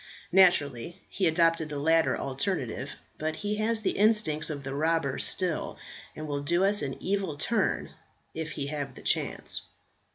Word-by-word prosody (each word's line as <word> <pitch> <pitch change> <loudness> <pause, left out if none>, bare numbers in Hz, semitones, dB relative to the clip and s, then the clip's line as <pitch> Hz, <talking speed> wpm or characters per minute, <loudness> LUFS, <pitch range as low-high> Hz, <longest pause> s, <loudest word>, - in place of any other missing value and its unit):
Naturally 170 -6 +3
he 190 - +1
adopted 165 -1 +2
the 150 - -4
latter 160 +3 +3
alternative; 135 - -2 0.2
but 155 0 -2
he 210 +3 -2
has 220 +1 0
the - - +2
instincts 210 -9 +3
of 145 -2 -5
the 135 0 -4
robber 155 -2 0
still, 180 -4 0 0.4
and 155 0 -6
will 145 -1 -2
do 170 +6 +2
us 205 +1 +3
an 135 -2 -3
evil 190 -6 -1
turn, 220 +9 0 0.4
if 160 -1 -4
he 140 - -3
have 140 -2 -4
the - - -12
chance." - - -1
160 Hz, 160 wpm, -28 LUFS, 145-190 Hz, 0.4 s, Naturally